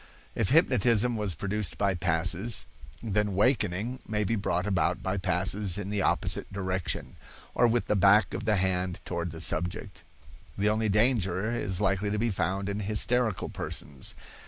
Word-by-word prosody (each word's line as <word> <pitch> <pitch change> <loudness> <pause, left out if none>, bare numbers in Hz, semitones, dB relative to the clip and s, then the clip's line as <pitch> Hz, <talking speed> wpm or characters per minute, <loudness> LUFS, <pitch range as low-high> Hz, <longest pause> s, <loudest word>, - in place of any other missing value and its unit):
If 110 -4 0
hypnotism 125 - +3
was 105 -5 0
produced 100 +4 -3
by 100 -1 +1
passes, 90 +5 +1 0.4
then 105 -2 0
wakening 105 +1 +1
may 105 0 0
be 115 +3 0
brought 90 -3 -1
about 90 -3 0
by 95 +1 -1
passes 95 +1 0
in 100 0 -4
the 105 -1 0
opposite - - 0
direction, 95 -2 -3 0.4
or 120 - +4
with 115 -3 +1
the 105 - 0
back 100 +1 +4
of - - -4
the 110 -1 +2
hand 90 -1 -1
toward 85 -1 -3
the 80 0 -8
subject. 90 +2 -1 0.6
The 105 +1 +2
only 110 0 +1
danger 105 -2 +2
is 95 -6 -2
likely 100 0 +1
to 105 - -1
be 115 +2 0
found 95 +1 -2
in 100 +1 -3
hysterical 110 +1 +1
persons. 70 -2 -4
100 Hz, 160 wpm, -28 LUFS, 95-110 Hz, 0.6 s, or